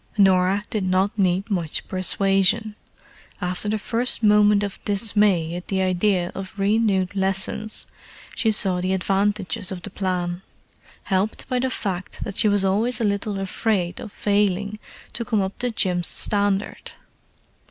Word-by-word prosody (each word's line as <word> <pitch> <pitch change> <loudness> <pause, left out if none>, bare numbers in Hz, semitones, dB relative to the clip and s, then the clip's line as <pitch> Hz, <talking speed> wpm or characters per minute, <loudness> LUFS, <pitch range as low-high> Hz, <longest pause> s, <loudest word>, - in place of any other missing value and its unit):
Norah 190 0 +3
did 215 -3 -1
not 185 +2 +1
need 190 +1 0
much 170 -5 -2
persuasion; 195 +3 +2 0.7
after 180 +2 -1
the 215 - 0
first 235 +3 +1
moment 210 -1 +5
of 200 -2 -6
dismay 200 -5 +1
at 180 - -7
the 195 - -1
idea 185 -1 +1
of 195 +1 -8
renewed 200 -2 +1
lessons 195 +2 -1 0.5
she 225 -3 +1
saw 190 -4 +2
the 185 +1 0
advantages 195 +1 -1
of 180 -2 -6
the 205 - -6
plan—helped 185 +2 -4
by 255 -1 -1
the 260 +1 0
fact 190 -6 -4
that 200 - -6
she 220 - +3
was 205 -1 +2
always 215 +6 +1
a - - -1
little 200 0 -1
afraid 195 -2 -1
of 225 -4 -8
failing 205 0 0 0.3
to 235 - -4
come 225 -2 0
up 190 0 -2
to 245 - 0
Jim's 180 -6 +1
standard. 205 -1 +2
195 Hz, 145 wpm, -22 LUFS, 185-210 Hz, 0.7 s, moment